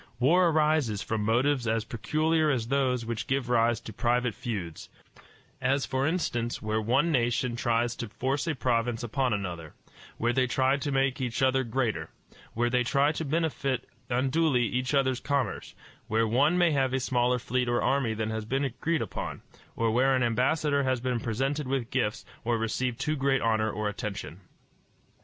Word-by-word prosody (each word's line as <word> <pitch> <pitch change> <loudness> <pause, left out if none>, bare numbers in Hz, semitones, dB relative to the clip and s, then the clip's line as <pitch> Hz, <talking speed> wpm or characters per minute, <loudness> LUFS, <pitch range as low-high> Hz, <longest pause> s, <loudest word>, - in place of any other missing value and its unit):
War 170 +8 +4
arises 150 -9 +1
from 110 -1 -2
motives 125 +3 +1
as 115 0 0
peculiar 155 +8 +1
as 120 -5 -1
those 130 -3 +1
which 115 0 -4
give 135 -2 -1
rise 120 -1 +3
to 110 - -9
private 125 +1 +1
feuds; 100 -10 -5 0.7
as, 135 +2 +1
for 130 +1 0
instance, 120 -9 -1
where 110 +1 -1
one 125 +10 +2
nation 120 -2 +1
tries 120 -1 0
to 115 - -5
force 135 +8 -2
a 160 - 0
province 120 -2 0
upon 125 +2 0
another; 90 -6 -4 0.4
where 120 +1 +1
they 130 0 +2
try 130 +2 +2
to 145 +1 -3
make 135 -1 +1
each 125 0 -1
other 130 0 +3
greater; 120 -1 -2 0.5
where 120 +1 +1
they 125 0 +2
try 140 +4 +2
to 160 - -4
benefit 140 -4 -1 0.2
unduly 130 +1 +2
each 125 +4 -1
other's 130 -2 +2
commerce; 140 -3 -2 0.3
where 115 +1 +1
one 140 +10 +3
may 175 -2 +4
have 135 -3 +1
a - - +1
smaller 125 -1 +1
fleet 125 0 -1
or 120 - +2
army 130 -5 +1
than 110 0 -2
has 110 0 -3
been 135 +5 0
agreed 160 +6 -1
on, - - -6 0.3
or 115 -1 +1
where 130 +3 +3
an 130 - +1
ambassador 140 +5 +1
has 130 -2 0
been 125 -1 -1
presented 135 +6 -2
with 130 -3 -2
gifts, 115 -5 -1 0.2
or 115 0 +1
received 115 +2 -2
too 155 - 0
great 135 -2 +1
honor 110 -1 +2
or 105 0 -2
attention. 100 -5 -5
125 Hz, 175 wpm, -28 LUFS, 115-135 Hz, 0.7 s, War